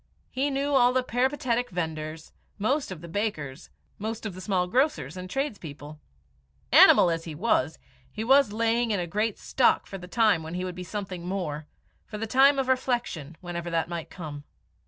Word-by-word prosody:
He 275 +3 0
knew 280 +1 -1
all 250 -2 +5
the 255 0 +2
peripatetic 245 -1 0
vendors, 160 -3 -4 0.3
most 265 +8 0
of 175 -4 -7
the 170 - -9
bakers, 160 -8 -3 0.3
most 220 +2 -4
of 210 - -3
the 185 - -9
small 185 -3 +1
grocers 215 - 0
and 185 0 -7
tradespeople. 160 - -5 0.7
Animal 175 - +8
as 165 0 -3
he 160 -3 -6
was, 160 - +1 0.3
he 215 - -4
was 270 -1 +5
laying 230 +2 +1
in 205 -3 +1
a 175 - -1
great 210 +5 -1
stock 260 - +2
for 195 - -8
the 180 - -10
time 215 -4 +3
when 160 +2 -6
he 180 +1 -2
would 180 - -4
be 180 +1 -7
something 185 -2 -5
more, 155 -6 -3 0.4
for 210 - -6
the 225 - -3
time 270 +5 +5
of 270 -1 0
reflection, 240 - -1
whenever 175 -1 -5
that 165 0 -1
might 170 -2 -5
come. 150 -5 -8
195 Hz, 185 wpm, -27 LUFS, 165-245 Hz, 0.7 s, Animal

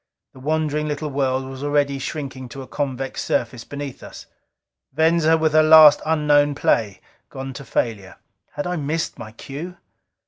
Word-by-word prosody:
The 130 - -14
wandering 150 +1 -1
little 150 0 -3
world 130 -1 -1
was 135 +1 -8
already 145 -1 0
shrinking 135 -3 -6
to 135 +3 -8
a - - -13
convex 135 -2 -4
surface 115 -1 -2
beneath 145 -1 -7
us. - - -11 0.7
Venza, 160 +2 +3
with 160 -1 +1
her 155 - +6
last 155 -1 +8
unknown 145 -2 +3
play, 105 -8 0 0.3
gone 135 0 -7
to 140 - -9
failure. 110 -6 -3 0.4
Had 145 - -4
I 180 0 -2
missed 155 +2 -3
my 110 -2 -8
cue? 150 +10 -8
145 Hz, 160 wpm, -21 LUFS, 130-155 Hz, 0.7 s, last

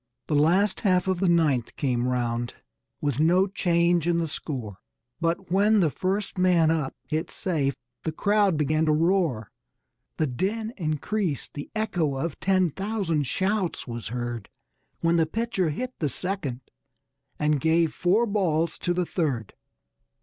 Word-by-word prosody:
The - - -3
last 175 +7 +3
half 185 -3 +2
of 185 -2 +1
the 190 -1 +2
ninth 150 -8 +2
came 125 -3 0
round, 120 -1 -1 0.5
with 145 -2 -1
no 175 +5 +4
change 175 -3 +1
in 170 -1 +2
the 165 -1 0
score; 125 - -5 0.4
But 170 +2 -1
when 205 +3 +4
the 165 -6 +3
first 195 +3 -2
man 175 -3 +4
up 155 -5 -1
hit 155 +1 -2
safe 145 -7 -1 0.3
the 160 - -2
crowd 200 +1 +2
began 155 +2 +1
to 155 - +4
roar. 160 - +1 0.7
The 155 - +2
din 210 - -2
increased, 165 - -2
the 145 - -7
echo 180 -10 0
of 150 +3 -3
ten 185 -3 +2
thousand 190 - -1
shouts 190 - -1
was 120 -2 -5
heard 120 -2 -4 0.5
When 165 0 +3
the 165 -1 +3
pitcher 225 -2 -1
hit 250 - -4
the 150 - 0
second 150 -6 -3 0.8
and 150 -2 +1
gave 160 0 +3
"four 195 +7 +2
balls" 170 -7 0
to 175 0 0
the 180 0 +1
third. 140 - -2
165 Hz, 150 wpm, -26 LUFS, 145-190 Hz, 0.8 s, no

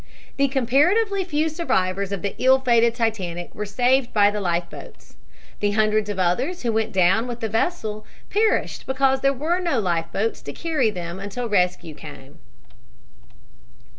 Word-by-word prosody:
The 275 0 +3
comparatively 345 - +2
few 315 -3 0
survivors 200 - -1
of 200 -1 -4
the 200 - -2
ill 260 +1 +5
fated 235 -3 +3
Titanic 190 -7 -3
were 210 0 -5
saved 250 +4 +2
by 205 -1 +4
the 210 0 -3
life 175 -2 -1
boats. - - -13 0.4
The 205 0 0
hundreds 215 0 +1
of 205 - -3
others 245 - 0
who 235 -2 0
went 220 0 0
down 190 +5 +3
with 240 -1 -5
the 225 - -2
vessel 220 - -2 0.3
perished 430 +1 0
because 265 0 +1
there 275 - +3
were 310 +7 -1
no 335 -9 0
life 170 -4 -1
boats 220 +3 -2
to - - -7
carry 310 -9 0
them 175 -2 -6
until 205 +5 -4
rescue 180 -5 0
came. 145 0 -12
225 Hz, 165 wpm, -23 LUFS, 195-270 Hz, 0.4 s, ill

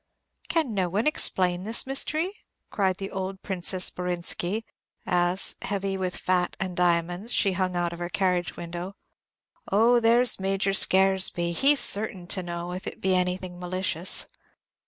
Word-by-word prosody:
"Can 310 -7 +1
no 185 -3 0
one 205 +6 -1
explain 185 - +2
this 225 +3 +1
mystery?" 310 +6 0 0.4
cried 190 -3 0
the 195 0 -6
old 190 0 -5
Princess 185 -1 0
Borinsky, 180 +4 -3 0.4
as, 180 0 +2
heavy 195 -1 -2
with 185 -1 -2
fat 180 -1 0
and 185 -2 -3
diamonds, 175 +4 0
she 200 - +3
hung 185 -1 -1
out 175 -1 -1
of 170 - -9
her 175 0 -4
carriage 180 -2 0
window. 175 +3 -6 0.8
"Oh, 230 +4 +5
there 235 +2 +4
's 230 - +2
Major 195 0 0
Scaresby; 190 -3 +3
he 275 +12 +4
is 280 - +2
certain 200 -5 0
to 190 - +2
know, 175 0 -5
if 185 +1 -6
it - - -6
be 190 0 +1
anything 180 0 -1
malicious." 180 -1 -1
185 Hz, 155 wpm, -26 LUFS, 180-200 Hz, 0.8 s, Oh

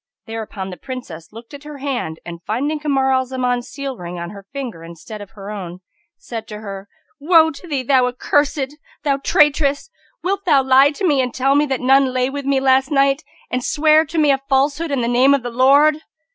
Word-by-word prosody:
Thereupon 215 -4 -6
the 180 - -8
Princess 245 - -8
looked 230 +4 -13
at 285 0 -10
her 300 -1 -9
hand 255 - -4
and, 170 -1 -8
finding 285 - -2
Kamar 270 -3 +1
al 260 0 +2
Zaman's 250 -1 -2
seal 275 -2 -6
ring 175 0 -7
on 170 0 -6
her 200 -1 -12
finger 255 -11 -6
in 170 +1 -10
stead 210 +6 -10
of 205 - -10
her 200 +1 -7
own, 180 -3 -7 0.4
said 225 -2 -7
to 210 0 -8
her, 200 -1 -8 0.3
"Woe 320 +1 +5
to 300 +4 -12
thee, 280 -5 -2
thou 255 -1 +3
accursed! 285 +2 -1 0.3
thou 280 -2 +1
traitress! 285 0 +2 0.3
wilt 395 +2 -1
thou 285 -6 +4
lie 265 +2 +5
to 310 +7 -4
me 290 -6 +3
and 250 -1 -2
tell 270 +1 +2
me 295 +1 +3
that 265 -2 -2
none 265 0 +3
lay 255 +1 0
with 285 0 -5
me 275 -1 +2
last 265 0 +3
night 275 0 +2 0.3
and 255 0 -1
swear 310 +2 +4
to 320 +2 -6
me 300 -2 +4
a 270 - +1
falsehood 285 +4 +1
in 275 -3 -1
the 235 - -1
name 255 +4 +4
of 275 - -3
the 245 - -4
Lord?" 280 +5 +4
265 Hz, 215 wpm, -19 LUFS, 230-285 Hz, 0.4 s, Woe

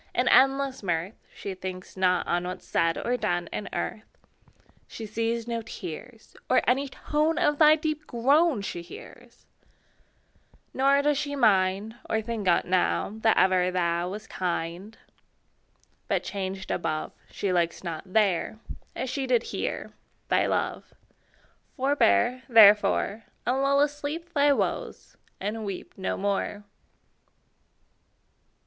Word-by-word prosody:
In - - +1
endless 270 0 +4
mirth, 175 0 -2 0.2
She 200 - -6
thinks 185 0 -7
not 185 -1 +2
on 175 0 0
What's 180 +1 -6
said 165 0 +1
or 245 +1 -1
done 175 -6 -1
In 210 - -4
earth: 215 - -5 0.7
She 225 - -8
sees 230 +2 -2
no 230 -1 -2
tears, 220 +3 -9
Or - - +4
any 265 +4 +2
tone 305 +4 0
Of 295 -1 +1
thy 305 -1 +7
deep 310 -1 -3
groan 275 +1 +2
She 175 - -4
hears; 170 - -13 1.3
Nor 275 +1 +3
does 295 -1 +2
she 285 -1 -3
mind, 205 -2 +2
Or 220 - +1
think 220 -2 -4
on't 175 - +3
now, 185 +2 +1
That 220 0 +3
ever 185 -1 +4
thou 175 -1 0
Wast 210 +3 -7
kind: 180 +3 -4 1.1
But - - 0
changed 190 -1 -5
above, 155 0 -2 0.2
She 195 -2 -2
likes 170 -1 0
not 165 -3 -4
there, 205 -1 +1 0.4
As 260 - -3
she 265 +1 -3
did 245 -2 +2
here, - - -4 0.4
Thy - - +3
love. - - -2 0.8
Forbear, 255 - +2
therefore, 210 -1 +5 0.2
And 260 +2 +1
lull 280 0 +3
asleep 295 +3 -2
Thy 285 -1 +4
woes, 280 - -2 0.2
and 215 +3 -3
weep 195 -3 -6
No 190 - -3
more. 200 +1 -2
215 Hz, 130 wpm, -27 LUFS, 185-270 Hz, 1.3 s, thy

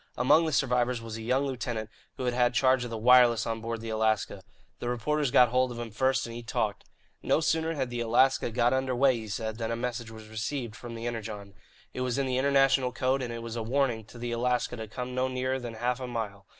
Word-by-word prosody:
Among 150 +6 +4
the - - -1
survivors 125 -3 +1
was 115 -1 -7
a - - -7
young 130 +5 +1
lieutenant 120 -5 -4 0.3
who - - -4
had 125 - +1
had 125 0 +2
charge 130 0 +3
of 120 - -5
the 115 - -4
wireless 120 0 +5
on 115 -1 -3
board 115 0 -4
the 115 0 -5
Alaska. 110 -1 0 0.4
The 120 - -3
reporters 140 +4 0
got 125 -2 +6
hold 130 +1 +2
of 120 - -7
him 120 -1 -5
first, 130 +4 +1
and 115 - -7
he 120 - -6
talked. 110 -3 -2 0.4
No - - +2
sooner 160 0 0
had 130 -4 -2
the 120 - -3
Alaska 120 +3 +3
got 120 +1 +2
under 130 -1 0
way, 130 +1 +4
he 110 -1 -7
said, 110 +2 -4
than 115 -1 -2
a 115 - -1
message 120 -1 -4
was 110 -1 -11
received 115 +1 -4
from 120 -1 -8
the 115 +1 -6
Energon. 110 -4 -5 0.4
It 125 - -4
was 125 -1 -1
in 140 - +1
the 130 -1 0
international 135 -2 +3
code, 130 +3 0
and 125 -2 -3
it 115 0 -6
was 115 0 -6
a 115 - -2
warning 120 -1 0
to 120 - -14
the 120 0 -4
Alaska 125 +1 0
to 110 -2 -6
come 125 +3 -6
no 130 +1 +1
nearer 130 +1 -1
than 120 -2 -7
half 125 +2 -1
a 130 - -5
mile. 105 -5 -5
120 Hz, 245 wpm, -28 LUFS, 115-130 Hz, 0.4 s, got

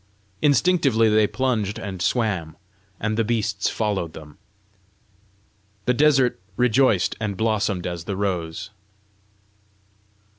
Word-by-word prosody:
Instinctively 140 -5 +3
they 105 0 +4
plunged 110 -6 -1
and 95 -2 -6
swam, 95 -6 -1 0.4
and 110 0 -1
the 115 - +2
beasts 105 -3 -1
followed 100 -7 -2
them. 75 -2 -12 1.5
The 125 - +3
desert 135 -5 +3 0.2
rejoiced 125 -5 +3
and 105 -3 -2
blossomed 105 -4 0
as 85 -2 -5
the 100 - -3
rose. 95 -1 -3
105 Hz, 105 wpm, -23 LUFS, 95-120 Hz, 1.5 s, they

